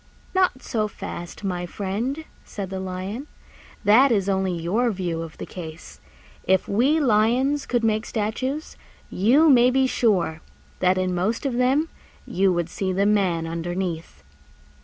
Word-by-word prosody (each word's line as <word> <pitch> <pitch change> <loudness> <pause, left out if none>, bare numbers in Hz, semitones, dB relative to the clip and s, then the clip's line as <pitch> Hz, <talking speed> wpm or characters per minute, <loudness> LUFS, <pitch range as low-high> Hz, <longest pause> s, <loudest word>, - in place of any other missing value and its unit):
"Not 370 -8 +1
so 215 -3 -1
fast, 175 -2 -8
my 180 -2 -2
friend," 225 - -3 0.2
said 195 -2 -6
the 190 - -3
Lion: 190 +8 -5 0.6
"that 235 +6 +6
is 200 -4 +1
only 190 -2 0
your 210 +9 +1
view 180 -5 -2
of 165 -1 -8
the - - -6
case. 160 -2 -9 0.4
If 190 0 +2
we 260 +10 +2
Lions 255 +3 +2
could 240 -2 0
make 220 0 +1
statues, 255 +8 -3 0.3
you 255 - +4
may 250 -4 +6
be 265 +1 +3
sure 185 -11 +1 0.4
that 185 0 +3
in 185 -1 0
most 210 +9 -1
of 270 - 0
them 260 +6 +2 0.4
you 190 0 +2
would 175 -2 0
see 190 +2 -3
the 195 +2 +1
Man 190 -6 +2
underneath." 170 - -4
200 Hz, 150 wpm, -24 LUFS, 180-245 Hz, 0.6 s, that